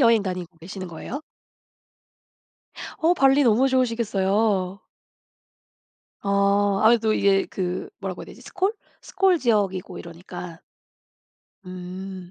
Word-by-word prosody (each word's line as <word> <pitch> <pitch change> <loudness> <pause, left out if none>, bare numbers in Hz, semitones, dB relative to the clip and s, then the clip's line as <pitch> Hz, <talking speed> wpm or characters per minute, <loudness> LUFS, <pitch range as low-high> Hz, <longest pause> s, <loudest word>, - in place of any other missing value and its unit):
여행 230 -4 +5
다니고 180 -3 -5
계시는 185 +2 -7
거예요? 175 - -6 1.8
어 330 +2 +4
발리 275 -1 +4
너무 245 +3 +4
좋으시겠어요. 210 -6 +1 1.4
어. 200 0 +2
아무래도 220 0 +4
이게 195 -2 +3
그 180 -1 -3
뭐라고 190 -2 -5
해야 - - -10
되지? - - -13
스콜 380 +2 -1 0.3
스콜 380 -3 +2
지역이고 205 - 0
이러니까. 170 0 -9 1.1
음. 185 0 -8
200 Hz, 245 characters per minute, -24 LUFS, 185-230 Hz, 1.8 s, 여행